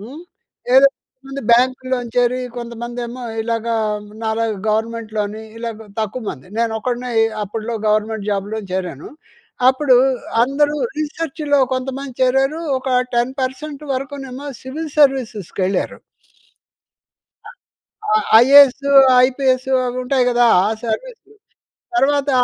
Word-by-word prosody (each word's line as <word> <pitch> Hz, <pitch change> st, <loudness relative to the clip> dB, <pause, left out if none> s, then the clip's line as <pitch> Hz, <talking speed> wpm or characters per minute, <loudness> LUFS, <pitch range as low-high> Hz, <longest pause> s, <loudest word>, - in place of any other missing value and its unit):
హ్మ్, 275 Hz, +10 st, -10 dB, 0.5 s
ఏదో 275 Hz, +1 st, +8 dB, 0.6 s
బ్యాంకులో 255 Hz, +1 st, +2 dB, 0.2 s
చేరి 245 Hz, +1 st, +2 dB, 0.2 s
కొంతమందేమో 240 Hz, +1 st, -6 dB, 0.2 s
ఇలాగా 230 Hz, 0 st, -2 dB, 0.5 s
నాలాగా 220 Hz, -1 st, -1 dB
గవర్నమెంట్‍లోని 220 Hz, -1 st, -2 dB, 0.2 s
ఇలాగ 225 Hz, -2 st, -6 dB
తక్కువమంది. 215 Hz, -, -5 dB
నేను 230 Hz, -1 st, +1 dB
ఒక్కడినే 245 Hz, 0 st, -3 dB, 0.3 s
అప్పట్లో 220 Hz, +3 st, -5 dB
గవర్నమెంట్ 215 Hz, 0 st, -1 dB
జాబ్‌లో 205 Hz, +2 st, -2 dB
చేరాను. 180 Hz, -6 st, -4 dB, 0.6 s
అప్పుడు 260 Hz, 0 st, +3 dB, 0.5 s
అందరూ 290 Hz, +4 st, +1 dB, 0.2 s
రిసర్చ్‌లో 305 Hz, -1 st, -1 dB, 0.2 s
కొంతమంది 265 Hz, +1 st, -4 dB
చేరారు. 270 Hz, +5 st, +2 dB, 0.2 s
ఒక 260 Hz, +1 st, -6 dB, 0.3 s
10% 265 Hz, +4 st, -2 dB
వరకునేమో 275 Hz, 0 st, -6 dB, 0.2 s
సివిల్ 305 Hz, +4 st, -6 dB
సర్వీసెస్‌కి 255 Hz, -, +1 dB
వెళ్లారు. 190 Hz, 0 st, -2 dB, 1.5 s
అ! -, -, -9 dB, 0.6 s
ఆ! -, -, +5 dB, 0.3 s
ఐఏఎస్, 280 Hz, 0 st, +6 dB, 0.4 s
ఐపీఎస్ 260 Hz, -1 st, 0 dB, 0.2 s
అవి 245 Hz, +1 st, -3 dB
ఉంటాయి 255 Hz, 0 st, +1 dB
కదా! 240 Hz, 0 st, +3 dB, 0.2 s
ఆ -, -, +1 dB, 0.2 s
సర్వీస్. 455 Hz, -, -4 dB, 0.8 s
తర్వాత 285 Hz, -3 st, +2 dB
250 Hz, 100 wpm, -19 LUFS, 225-275 Hz, 1.5 s, ఏదో